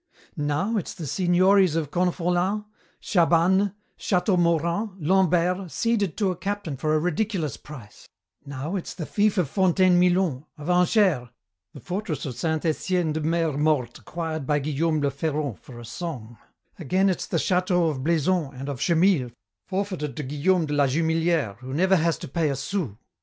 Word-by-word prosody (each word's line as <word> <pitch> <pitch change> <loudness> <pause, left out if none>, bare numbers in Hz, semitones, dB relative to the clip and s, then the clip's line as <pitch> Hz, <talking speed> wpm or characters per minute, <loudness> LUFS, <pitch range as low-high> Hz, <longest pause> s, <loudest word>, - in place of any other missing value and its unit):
"Now 150 +8 -1
it's 190 - -4
the 170 - -6
signories 185 +2 +3
of 155 -3 -2
Confolens, 180 +3 0 0.4
Chabanes, 180 +2 +3 0.3
Châteaumorant, 180 +1 +1
Lombert, 180 +1 +2
ceded 205 -2 0
to 200 -4 +1
a - - -4
captain 195 -5 -4
for 155 +4 0
a - - +3
ridiculous 175 - -1
price; 125 -8 -13 0.3
now 145 +5 -5
it's 185 - -5
the 165 - -5
fief 210 +3 +1
of 180 -5 +2
Fontaine 185 +1 +3
Milon, 175 -6 +1
of 150 +4 -3
Angers, 180 - +3 0.5
the - - -8
fortress 180 - -4
of 130 -4 -5
Saint 160 +2 -2
Etienne 165 0 0
de 155 - -2
Mer 165 -1 0
Morte 145 -6 0
acquired 160 -4 -5
by 150 - +2
Guillaume 155 +2 0
Le 140 -1 +1
Ferron 145 +1 -2
for 120 -2 -13
a 120 - -9
song; 120 -4 -7 0.4
again 185 +5 +1
it's 185 -3 -1
the - - -1
châteaux 180 -1 +1
of 130 -3 -5
Blaison 160 -2 +1
and 135 +2 -6
of 135 -3 -5
Chemille 170 -6 +3 0.4
forfeited 185 -8 -3
to 150 - -3
Guillaume 155 +6 +1
de 150 - -4
la 145 -1 +3
Jumelière 160 -5 0
who 130 +2 -7
never 190 +4 +3
has 165 0 +1
to - - -8
pay 155 +2 0
a 140 - -1
sou. 135 - -3
165 Hz, 165 wpm, -25 LUFS, 145-185 Hz, 0.5 s, signories